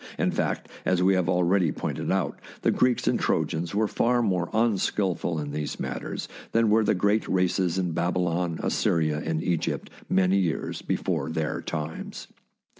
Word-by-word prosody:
In - - +1
fact, - - -1 0.2
as 90 -1 +2
we 95 +1 +5
have 90 -2 +1
already 90 -1 +3
pointed - - -3
out, - - 0 0.2
the - - +4
Greeks 125 -1 +2
and - - +3
Trojans 85 +4 0
were 110 +1 +2
far 120 +3 +2
more 90 -5 0
unskilful 100 -6 +1
in 75 -1 -4
these 75 0 -4
matters - - -4 0.3
than 115 -2 +3
were 110 +1 +5
the 105 - +2
great 100 +4 +2
races 90 -1 +1
in 90 -2 0
Babylon, 85 0 0
Assyria, 75 -2 +1
and 80 0 -1
Egypt 85 -3 -1 0.2
many 95 +1 +3
years 85 -6 -1
before - - -1
their 80 -1 -2
times. 75 +1 -5
90 Hz, 160 wpm, -26 LUFS, 80-100 Hz, 0.3 s, we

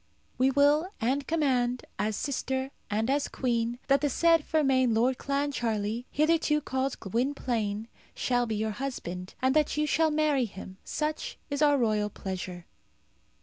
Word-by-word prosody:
We 260 +1 +5
will 290 +5 +3
and 270 +5 0
command, 255 -6 +1
as 215 0 0
sister 265 +1 -2 0.2
and 215 +2 0
as 280 +2 +1
Queen, 235 -2 -1
that 275 -1 +4
the 295 - +2
said 330 +3 +4
Fermain 265 -7 +2
Lord 250 +3 +2
Clancharlie, 240 -6 -1
hitherto 310 0 +2
called 265 -2 -2
Gwynplaine, 225 -2 -1 0.3
shall 245 -1 +1
be 220 - -1
your 215 +1 -1
husband, 195 -7 -5
and 260 +1 +3
that 300 -1 +2
you 300 - +2
shall 320 +1 +2
marry 300 -4 +2
him. 190 -2 -10
Such 310 +11 -3
is 285 +1 -1
our 290 -1 +5
royal 215 -4 +1
pleasure." 185 -3 -6
260 Hz, 145 wpm, -28 LUFS, 225-290 Hz, 0.3 s, We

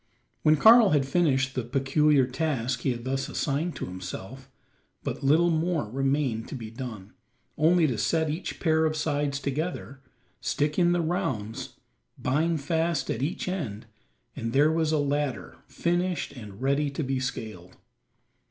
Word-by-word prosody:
When 155 0 +4
Karl 225 +1 +8
had 145 -4 +2
finished 135 -4 +1
the 125 - -2
peculiar 135 +3 +3
task 130 -2 -1
he - - -1
had 120 -1 -5
thus 135 +1 -2
assigned 150 +5 -1
to - - -4
himself, 95 +8 -8 0.5
but - - -4
little 160 +5 +4
more 160 -8 0
remained 135 -3 0
to - - -6
be 115 -4 -7
done 115 -5 -8 0.4
only 165 +2 +4
to 125 -7 -1
set 160 -1 +1
each 160 +5 -4
pair 160 -1 +2
of 155 0 0
sides 145 -2 -1
together, 140 0 -4 0.4
stick 150 +3 0
in 175 -1 +4
the 175 0 +2
rounds, 130 - -3 0.4
bind 155 +4 0
fast 165 +2 0
at 115 - -3
each 155 +8 -2
end, 130 - -4 0.5
and 115 0 -4
there 150 +3 +5
was 160 -1 +1
a 155 - +2
ladder 145 -8 -2
finished 175 +1 -1
and 105 -3 -10
ready 140 +2 +2
to 140 +3 -3
be 135 0 -1
scaled. 110 -8 -6
140 Hz, 155 wpm, -27 LUFS, 125-160 Hz, 0.5 s, Karl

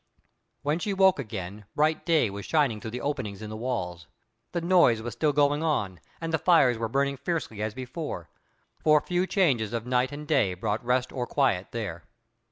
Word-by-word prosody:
When 150 +3 0
she 200 0 -2
woke 190 -4 +5
again, 100 -4 -6
broad 155 +1 +1
day 160 - +3
was 100 0 -6
shining 140 -9 +2
through 110 - -5
the 120 +2 -5
openings 115 -8 -3
in 105 - -6
the - - -5
walls. 90 - -3 0.4
The 175 - -1
noise 170 -9 +4
was 115 0 -5
still 150 +6 +1
going 145 +1 +2
on, 105 - -1 0.2
and 165 -1 -4
the 160 - +2
fires 135 -10 +4
were 115 -1 -2
burning 140 +2 0
fiercely 140 -7 -3
as 110 0 -2
before; 130 - -5 0.6
for 155 -1 +6
few 180 +3 0
changes 130 - +1
of 115 -1 -2
night 125 +1 +1
and 150 +1 -7
day 115 -12 +2
brought 105 +5 -2
rest 125 +1 +1
or 125 -2 -3
quiet 115 -10 +1
there. 95 -9 -5
125 Hz, 190 wpm, -27 LUFS, 110-155 Hz, 0.6 s, for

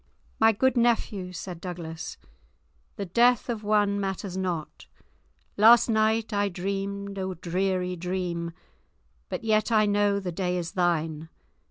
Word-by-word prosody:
"My 225 0 +6
good 260 +4 +1
nephew," 220 -6 +1
said 175 -1 -7
Douglas, 170 -3 -6 0.8
"the 200 - -4
death 240 +6 +3
of 225 -3 -3
one 205 -1 +2
matters 195 -1 -3
not; 180 -5 -4 0.7
last 230 +3 +7
night 220 0 +1
I 205 0 +1
dreamed 195 +2 -4
a 190 -1 -3
dreary 180 +1 -1
dream, 175 -1 -3 0.8
but - - -4
yet 215 +1 +2
I 215 -1 +4
know 205 -1 +2
the 185 -2 -4
day 180 +1 -1
is 170 -2 -4
thine. 165 -3 -1
195 Hz, 135 wpm, -26 LUFS, 180-215 Hz, 0.8 s, last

